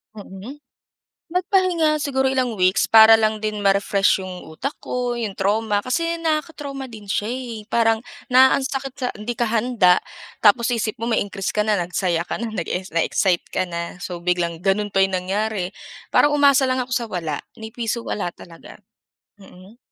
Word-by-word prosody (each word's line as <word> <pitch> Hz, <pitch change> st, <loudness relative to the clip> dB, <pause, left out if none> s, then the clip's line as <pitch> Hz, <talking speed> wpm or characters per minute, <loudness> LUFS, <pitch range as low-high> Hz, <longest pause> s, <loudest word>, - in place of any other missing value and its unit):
Mm. 205 Hz, +5 st, -9 dB, 0.8 s
Nagpahinga, 350 Hz, -4 st, +1 dB
siguro 265 Hz, -2 st, 0 dB
ilang 255 Hz, -4 st, 0 dB
weeks 185 Hz, +2 st, +2 dB
para 220 Hz, 0 st, +9 dB
lang 220 Hz, -1 st, +2 dB
din 215 Hz, -1 st, -3 dB
ma-refresh 200 Hz, 0 st, +2 dB
yung 185 Hz, -1 st, -7 dB
utak 250 Hz, -, -4 dB
ko, 245 Hz, -1 st, -2 dB
yung 225 Hz, -5 st, -4 dB
trauma. 205 Hz, +2 st, +1 dB
Kasi 335 Hz, +10 st, -1 dB
nakaka-trauma 300 Hz, -4 st, -3 dB
din 215 Hz, -3 st, -11 dB
siya 205 Hz, +3 st, -1 dB
eh. 240 Hz, -4 st, -5 dB
Parang 225 Hz, -1 st, +2 dB, 0.2 s
na 260 Hz, 0 st, +6 dB
ang 275 Hz, -, -4 dB
sakit 270 Hz, -1 st, -4 dB
sa 255 Hz, -2 st, -1 dB
hindi 215 Hz, +2 st, -6 dB
ka 240 Hz, -, +1 dB
handa 220 Hz, -5 st, +3 dB, 0.4 s
tapos 235 Hz, +3 st, +4 dB
isip 225 Hz, +1 st, -2 dB
mo 230 Hz, -, -3 dB
may 230 Hz, -, +1 dB
increase 195 Hz, -1 st, -4 dB
ka 210 Hz, -, +2 dB
na, 210 Hz, -1 st, +1 dB
nagsaya 175 Hz, -1 st, -1 dB
ka -, -, -4 dB
na, 230 Hz, 0 st, -4 dB
nag-es 185 Hz, -1 st, -4 dB
na-excite 170 Hz, +2 st, +1 dB
ka -, -, -2 dB
na. 170 Hz, -1 st, -5 dB
So, 175 Hz, -2 st, -5 dB
biglang 175 Hz, -1 st, -1 dB
gano'n 195 Hz, +3 st, 0 dB
pa 195 Hz, -, -1 dB
yung 195 Hz, -, -5 dB
nangyari, 190 Hz, +1 st, -2 dB, 0.4 s
parang 295 Hz, 0 st, +4 dB
umasa 280 Hz, -2 st, +5 dB
lang 255 Hz, 0 st, 0 dB
ako 250 Hz, -, -9 dB
sa 240 Hz, -1 st, -1 dB
wala, 165 Hz, -7 st, -3 dB, 0.2 s
ni 220 Hz, -1 st, -9 dB
piso 235 Hz, 0 st, -3 dB
wala 180 Hz, -6 st, -4 dB
talaga. 165 Hz, -2 st, -13 dB, 0.7 s
Mm. 190 Hz, +3 st, -16 dB
220 Hz, 175 wpm, -21 LUFS, 190-255 Hz, 0.8 s, para